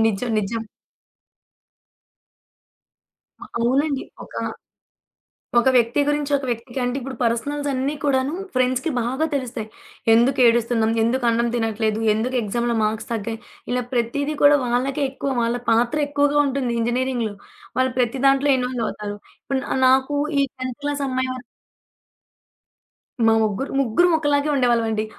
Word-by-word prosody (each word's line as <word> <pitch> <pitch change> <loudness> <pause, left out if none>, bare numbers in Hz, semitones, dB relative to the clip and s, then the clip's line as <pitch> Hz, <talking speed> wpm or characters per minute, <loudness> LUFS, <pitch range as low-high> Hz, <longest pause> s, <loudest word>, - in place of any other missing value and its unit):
నిజం. 225 +3 -1
నిజం. 225 +2 -2 2.8
అవునండి. 270 +4 0 0.2
ఒక - - -17 1.2
ఒక 240 +2 +4
వ్యక్తి 240 +2 +3
గురించి 295 0 0
ఒక 275 - -5
వ్యక్తికి 240 +2 -3
అంటే 245 +2 -1
ఇప్పుడు 265 +1 -6
పర్సనల్స్ 285 +5 -1
అన్నీ 270 +2 -1
కూడాను 270 -1 +1 0.2
ఫ్రెండ్స్‌కి 255 +4 +1
బాగా 260 +7 0
తెలుస్తాయి. 240 -5 -3 0.5
ఎందుకేడుస్తున్నాం? 235 -2 +3
ఎందుకు 245 +2 0
అన్నం 235 +1 +2
తినట్లేదు? 220 -1 0
ఎందుకు 240 +4 -2
ఎగ్జామ్‌లో 235 +3 -1
మార్క్స్ 215 0 -1
తగ్గాయి? 225 0 -3 0.3
ఇలా 250 0 0
ప్రతీదీ 280 +5 -1
కూడా 290 0 +7
వాళ్ళకే 260 +4 0
ఎక్కువ 275 +1 -4
వాళ్ళ 235 +1 0
పాత్ర 235 +5 +2
ఎక్కువగా 290 0 +1
ఉంటుంది 260 -3 -1
ఇంజినీరింగులో. 240 -2 -1 0.4
వాళ్ళు 260 0 +2
ప్రతి 250 +1 0
దాంట్లో 275 +1 +4
ఇన్‌వాల్వ్ 250 -2 -2
అవుతారు. 205 -1 -6 0.3
ఇప్పుడు 270 -1 -2
న 265 - -2
నాకు 265 +2 +3 0.2
ఈ - - +4 0.2
10థ్ 255 0 -5
క్లాస్ 290 -1 -1
అమ్మయి 260 0 -1
వ - - -6 1.9
మా 225 - +5
ముగ్గురు 215 +5 -1
ముగ్గురం 275 +9 +3
ఒక్కలాగే 290 -1 +1
ఉండేవాళ్ళమండి. 230 -4 +1
250 Hz, 125 wpm, -22 LUFS, 230-275 Hz, 2.8 s, కూడా